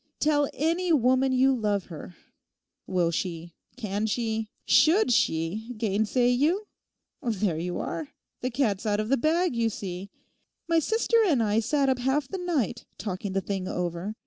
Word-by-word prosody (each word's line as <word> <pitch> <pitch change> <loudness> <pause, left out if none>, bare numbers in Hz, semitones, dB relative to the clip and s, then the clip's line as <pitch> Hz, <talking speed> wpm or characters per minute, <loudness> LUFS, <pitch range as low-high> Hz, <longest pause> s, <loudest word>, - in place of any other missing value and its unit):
Tell 290 -2 +2
any 335 +4 0
woman 260 -2 +3
you 260 +1 +4
love 205 -4 0
her; 170 +1 -9 0.7
will 175 -2 +1
she, 170 -1 -4 0.2
can 210 -2 -2
she, 220 -1 -2 0.2
should 315 +4 +4
she, 215 +5 0
gainsay 220 +4 +1
you? 310 +12 +2 0.6
There 210 - -1
you 175 +1 -3
are. 315 - -4 0.3
The 255 - -1
cat's 230 -5 0
out 205 0 +1
of 215 +1 -2
the 275 - +3
bag, 325 +2 +1
you 230 -1 +1
see. 190 -2 -6 0.6
My 330 -1 +3
sister 450 +7 +1
and 275 -10 +3
I 210 0 +2
sat 275 +5 +1
up 260 -1 +1
half 265 +2 0
the 380 - -5
night 300 - -2
talking 195 -1 -4
the 195 - +1
thing 190 -1 -3
over. 180 +4 -3
230 Hz, 160 wpm, -27 LUFS, 195-280 Hz, 0.7 s, you